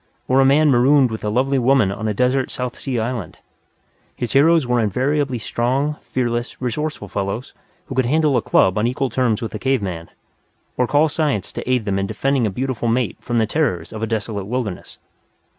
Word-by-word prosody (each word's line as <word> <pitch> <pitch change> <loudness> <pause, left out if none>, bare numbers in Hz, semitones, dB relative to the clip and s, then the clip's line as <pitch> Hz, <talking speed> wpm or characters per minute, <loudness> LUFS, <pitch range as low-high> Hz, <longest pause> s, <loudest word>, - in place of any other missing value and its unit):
Or 130 +1 +3
a - - +4
man 145 +2 +4
marooned 130 +1 +4
with 110 - -5
a 105 - -1
lovely 130 +5 +1
woman 125 -5 +3
on 110 +3 -4
a 105 - 0
desert 130 +3 +1
South 125 -1 -4
Sea 130 -3 -3
island. 120 0 -4 0.8
His 120 - -4
heroes 160 +2 +5
were 125 0 +1
invariably 130 +5 0
strong, 130 +6 -1
fearless, 120 -1 -3
resourceful 130 -1 -3
fellows, 100 +6 -4 0.3
who 135 - -7
could 130 -2 +1
handle 150 0 +2
a 120 - +3
club 95 -1 +3
on 110 - +2
equal 130 0 -1
terms 120 -2 0
with 115 - -5
a 110 - -4
cave 130 -3 0
man, 85 -3 -5 0.7
or 125 - +1
call 150 +4 +3
science 145 - -1
to - - -6
aid 125 -4 +1
them 100 -1 0
in 100 - -1
defending 125 +3 0
a - - 0
beautiful 125 +3 -3
mate 115 -3 0
from 120 -1 -2
the 110 - +3
terrors 110 - -1
of 110 - -6
a 110 - -1
desolate 105 -3 -3
wilderness. 115 -5 -4
125 Hz, 200 wpm, -20 LUFS, 110-135 Hz, 0.8 s, heroes